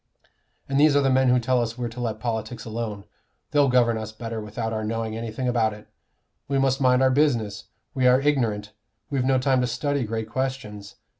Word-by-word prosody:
And 135 0 0
these 150 -1 +5
are 145 - +5
the 135 -1 +2
men 130 0 +4
who 125 0 +4
tell 125 +1 +1
us 115 0 -3
we're 120 -1 -2
to 120 +2 -10
let 115 -3 -3
politics 115 +1 -4
alone; 110 -3 -4 0.5
they'll 145 -2 +4
govern 120 -3 +3
us 110 0 -6
better 115 0 -6
without 110 +1 -4
our 110 0 -2
knowing 110 0 -3
anything 115 +3 -4
about 115 -3 +1
it. 105 0 -13 0.6
We 140 - 0
must 135 0 +1
mind 130 0 +4
our 130 - +4
business; 120 -8 +1 0.3
we 130 -2 +2
are 125 +1 +6
ignorant; 115 -8 0 0.4
we've 135 -3 0
no 130 0 +3
time 130 0 +2
to 125 - +1
study 140 +3 -1
great 110 0 -3
questions. 115 -5 -4
120 Hz, 205 wpm, -24 LUFS, 110-130 Hz, 0.6 s, are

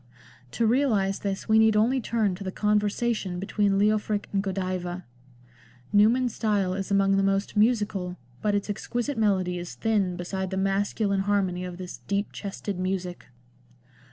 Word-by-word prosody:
To 230 - +1
realise 220 -6 +2
this 195 -1 -3
we 220 0 +5
need 220 -1 +5
only 245 +5 +3
turn 220 -4 0
to 180 - -7
the 190 - -3
Conversation 210 -2 0
between 200 +1 +1
Leofric 210 0 +1
and 195 - +2
Godiva. 185 -2 -3 0.9
Newman's 230 +4 +4
style 200 -4 0
is 195 +1 -4
among 195 0 +3
the - - +3
most 195 +1 0
musical, 210 -5 +1 0.2
but 210 -1 +1
its 200 - -1
exquisite 240 +6 -3
melody 185 -4 +1
is 175 -1 -7
thin 205 -5 0
beside 190 +2 -3
the 190 - -3
masculine 200 +1 0
harmony 195 -2 0
of 180 -1 -6
this 180 -1 -7
" - - -30
deep 200 +1 -1
chested 200 -1 -5
music." 185 -1 -3
200 Hz, 155 wpm, -26 LUFS, 190-215 Hz, 0.9 s, we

